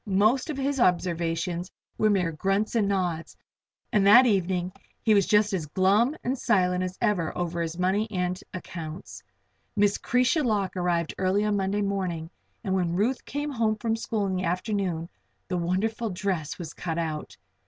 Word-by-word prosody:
Most 215 - +2
of 300 - -3
his 275 0 -1
observations 175 -2 0 0.3
were 215 - +4
mere 185 -5 +2
grunts 195 +6 0
and 220 -4 +2
nods, 180 -4 -2 0.6
and 200 -2 +4
that 240 +6 +9
evening 185 -4 +1 0.3
he 220 - +4
was 200 -3 +4
just 210 -1 +3
as 165 -5 -2
glum 200 - +3
and 255 +2 0
silent 180 -4 +2
as 185 +1 -4
ever 200 -8 0
over 170 -1 -2
his 165 0 -3
money 190 +4 +1
and 180 -2 -2
accounts. 170 -2 -7 0.5
Miss 205 -1 +2
'Cretia 250 +5 +2
Lock 205 -6 0
arrived 175 -2 0
early 190 +2 +2
on 210 -1 +1
Monday 200 +1 0
morning 185 -5 -2 0.3
and 190 -4 -1
when 175 -2 0
Ruth 230 +7 0
came 290 +1 -3
home 225 -4 +1
from 225 +1 -1
school 225 -2 -2
in 190 - -1
the 185 - -2
afternoon 180 -2 -1 0.4
the 180 - 0
wonderful 210 +6 -1
dress 180 -5 -2
was 165 -4 -7
cut 165 -2 -4
out. 160 -2 -4
190 Hz, 170 wpm, -26 LUFS, 175-215 Hz, 0.6 s, that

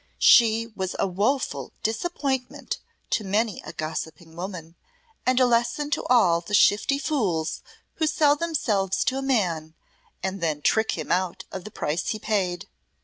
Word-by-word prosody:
"She 230 -1 +6
was 190 -1 -3
a - - +1
woeful 210 +9 -1
disappointment 265 +2 -2 0.3
to 220 - +1
many 210 +2 0
a 155 - -7
gossiping 160 +1 -6
woman, 175 -2 -6 0.5
and 255 0 +4
a 255 - +6
lesson 240 +5 +1
to 295 - 0
all 180 -9 +4
the 205 +4 -1
shifty 210 +7 +4
fools 200 - -1 0.4
who 315 - +1
sell 295 -1 +4
themselves 225 - 0
to 270 -2 0
a - - -3
man, 175 -12 0 0.5
and 190 0 -3
then 155 -3 -1
trick 220 0 +2
him 155 - -4
out 180 -1 0
of 190 0 -6
the 215 - -8
price 155 -1 -2
he 215 - -1
paid." 195 -5 -1
210 Hz, 155 wpm, -25 LUFS, 175-255 Hz, 0.5 s, She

